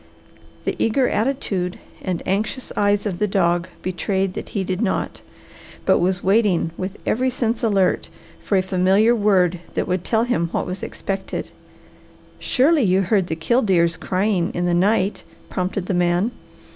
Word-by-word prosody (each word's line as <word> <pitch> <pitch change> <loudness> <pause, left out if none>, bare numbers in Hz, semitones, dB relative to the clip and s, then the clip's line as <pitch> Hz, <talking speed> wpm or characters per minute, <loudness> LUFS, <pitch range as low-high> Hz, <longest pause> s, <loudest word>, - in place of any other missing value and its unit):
The - - -1
eager 245 +3 +2
attitude 205 -7 -1 0.2
and 180 -2 -3
anxious 215 +7 -2
eyes 205 0 +2
of 190 -4 -3
the 210 - +2
dog 175 -3 +1 0.2
betrayed 190 +1 -1
that - - -6
he 200 - -2
did 185 +2 -2
not, 210 - -1 0.6
but - - +4
was 180 +1 0
waiting 195 -4 +2
with 185 +3 -5
every 255 +3 +1
sense 235 -2 -1
alert 200 -5 +1 0.3
for 200 - 0
a 185 - +2
familiar 190 +4 +3
word 190 -5 +2 0.2
that - - -1
would 180 0 -1
tell 225 +2 +1
him 235 -9 0
what - - -1
was 180 +1 -5
expected. 195 -1 -4 0.9
"Surely 290 +4 +3
you 190 -3 +3
heard 190 -1 +1
the 160 - -2
killdeers 170 -3 +2
crying 185 0 0
in 175 - 0
the 175 - +1
night," 195 +2 +1 0.3
prompted 185 0 -2
the 190 - -1
man. 175 +5 +2
190 Hz, 160 wpm, -21 LUFS, 180-215 Hz, 0.9 s, but